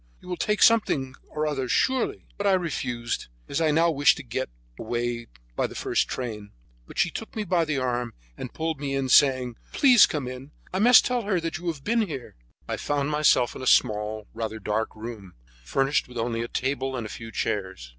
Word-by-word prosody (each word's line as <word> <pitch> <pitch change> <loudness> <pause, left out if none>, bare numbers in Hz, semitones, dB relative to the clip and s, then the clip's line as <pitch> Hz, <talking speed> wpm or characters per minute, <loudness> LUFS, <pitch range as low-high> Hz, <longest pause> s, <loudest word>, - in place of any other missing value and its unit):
You - - -16
will 180 - -2
take 210 +3 +1
something 145 - +3 0.2
or 155 0 -2
other, 135 -4 -2
surely?" 260 - +1
But 205 - -1
I 195 - +5
refused, 125 -9 -2 0.2
as 140 - -2
I 160 - +3
now 165 +3 +3
wished 145 -2 +4
to 145 - -7
get 130 +2 -3 0.3
away 120 +1 -3 0.3
by - - 0
the - - -12
first - - 0
train; 105 -5 -5 0.3
but - - -12
she 170 - +2
took 225 - -7
me 215 - -1
by 175 -3 +1
the 155 -2 -1
arm 125 -2 -2 0.2
and 125 - -7
pulled 160 -2 -3
me 140 -1 -2
in, 135 -1 -1
saying: 130 -4 +4 0.2
"Please, 250 -6 +7
come 145 -5 -3
in; 130 +3 -8 0.2
I 190 - 0
must 240 +4 +7
tell 250 -1 0
her 200 -4 0
that 165 +1 -3
you 175 - -7
have 155 -5 -3
been 230 +5 +2
in 215 - -1
here." 135 -7 -7 0.3
I - - -2
found 145 0 -1
myself 150 -5 +3
in - - -7
a 130 - -4
small, 105 -1 +2
rather 110 -1 -4
dark 110 +1 -2
room, 110 -4 -8 0.3
furnished 135 - +1
with 125 -1 -10
only 115 0 -1
a 115 - -3
table 130 +1 -2
and 115 - -4
a 110 - -7
few 115 0 -9
chairs. 95 - -3
135 Hz, 215 wpm, -26 LUFS, 120-165 Hz, 0.3 s, Please